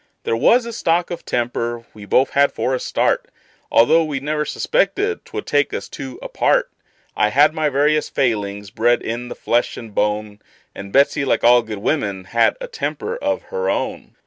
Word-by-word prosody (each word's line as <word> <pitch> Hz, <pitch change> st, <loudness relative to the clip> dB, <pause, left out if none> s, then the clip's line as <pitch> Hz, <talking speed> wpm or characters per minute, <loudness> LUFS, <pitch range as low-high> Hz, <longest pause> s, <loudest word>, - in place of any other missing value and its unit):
There -, -, 0 dB
was 235 Hz, -, +4 dB
a 235 Hz, -, -6 dB
stock 175 Hz, -4 st, 0 dB
of 170 Hz, -, -6 dB
temper 120 Hz, -1 st, -2 dB
we 105 Hz, -1 st, -11 dB
both 130 Hz, +6 st, +2 dB
had 140 Hz, 0 st, +3 dB
for 130 Hz, -, -1 dB
a 130 Hz, -, 0 dB
start, -, -, 0 dB, 0.4 s
Although 160 Hz, +8 st, +5 dB
we 150 Hz, -3 st, -3 dB
never 150 Hz, +2 st, -2 dB
suspected 435 Hz, -, 0 dB
'twould 425 Hz, 0 st, -6 dB
take 145 Hz, -1 st, +1 dB
us -, -, -5 dB
two 130 Hz, -2 st, -8 dB
apart; -, -, +1 dB, 0.4 s
I 105 Hz, -, +2 dB
had 145 Hz, +6 st, +4 dB
my 155 Hz, -2 st, 0 dB
various 150 Hz, +2 st, +1 dB
failings, 105 Hz, -5 st, -1 dB
bred 120 Hz, +3 st, +2 dB
in 120 Hz, +2 st, -4 dB
the -, -, -7 dB
flesh 120 Hz, +1 st, 0 dB
and 115 Hz, -3 st, -9 dB
bone; 105 Hz, 0 st, -1 dB, 0.3 s
And 100 Hz, 0 st, -9 dB
Betsey, 140 Hz, +3 st, +3 dB
like 135 Hz, -, 0 dB
all 120 Hz, +1 st, +6 dB
good 110 Hz, -2 st, -7 dB
women, 100 Hz, -5 st, -1 dB
had 115 Hz, +5 st, +2 dB
a -, -, -5 dB
temper 460 Hz, 0 st, -4 dB
of -, -, -2 dB
her 475 Hz, +1 st, -1 dB
own. -, -, -3 dB
130 Hz, 185 wpm, -20 LUFS, 110-155 Hz, 0.4 s, all